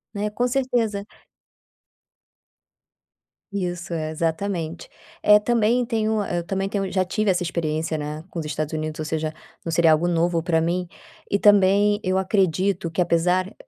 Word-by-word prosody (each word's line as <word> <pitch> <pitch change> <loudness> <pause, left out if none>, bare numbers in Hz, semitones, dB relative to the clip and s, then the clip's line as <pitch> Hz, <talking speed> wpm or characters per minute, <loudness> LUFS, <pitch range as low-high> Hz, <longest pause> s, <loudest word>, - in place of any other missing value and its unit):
Né, 205 +1 -1
com 245 +4 0
certeza 240 -6 0 2.5
Isso. 180 -2 -3
É 155 -1 -2
exatamente. 165 +1 -3 0.3
Eh, 210 0 +7
também 235 +2 +2
tenho, 220 -2 0
hã, 205 - -2
eu 170 - -2
também 195 +2 -2
tenho 195 -2 -2
já 185 -1 +1
tive 215 +3 0
essa 180 -1 +1
experiência, 160 -2 -2
né, 150 +1 -5
com 170 - -5
os 160 - -4
Estados 155 +1 -3
Unidos, 155 0 -3
ou 155 - -3
seja, 155 0 -2 0.3
não 165 - -3
seria 165 -1 +4
algo 155 +3 +3
novo 170 0 +1
para 165 -1 +1
mim. 175 +2 -1 0.4
E 200 - +1
também 205 +1 +4
eu 185 0 +1
acredito 190 -1 +1
que, 175 - 0
apesar 180 +3 +1
180 Hz, 160 wpm, -23 LUFS, 165-205 Hz, 2.5 s, Eh